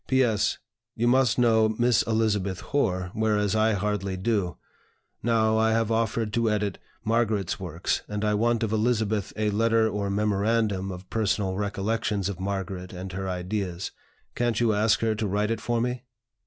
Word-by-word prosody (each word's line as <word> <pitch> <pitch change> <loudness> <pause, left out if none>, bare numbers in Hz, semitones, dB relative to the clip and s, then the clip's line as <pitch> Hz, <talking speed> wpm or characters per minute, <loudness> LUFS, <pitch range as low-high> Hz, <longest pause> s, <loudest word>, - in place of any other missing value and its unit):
"P. 130 0 +4
S. 110 -4 +1 0.4
You 120 +2 +1
must 125 -1 +3
know 110 -3 +4
Miss 120 +1 +3
Elizabeth 105 -4 0
Hoar, 95 -10 -1
whereas 105 -2 +1
I 110 +1 +3
hardly 100 -1 -1
do. 95 -3 -1 0.6
Now, 110 -1 +2
I 110 0 +3
have 115 0 +1
offered 110 -1 0
to 115 -2 +2
edit 105 -2 -1 0.2
Margaret's 110 -4 0
works, 85 -1 -2
and 105 0 -3
I 105 - +2
want 115 +2 +1
of 110 - -1
Elizabeth 110 -3 0
a 105 0 0
letter 115 +1 +3
or 100 -2 -2
memorandum 105 -1 0
of 90 +1 -9
personal 105 -3 0
recollections 105 0 -1
of 95 -3 -6
Margaret 95 -1 -4
and 90 +1 -6
her 95 +1 -4
ideas. 90 0 -3 0.4
Can't 120 -2 0
you 115 -2 +3
ask 105 +1 +2
her 110 -1 +2
to 110 0 -2
write 105 +3 0
it 115 - -2
for 120 -1 0
me? 125 +1 -1
105 Hz, 170 wpm, -26 LUFS, 100-115 Hz, 0.6 s, P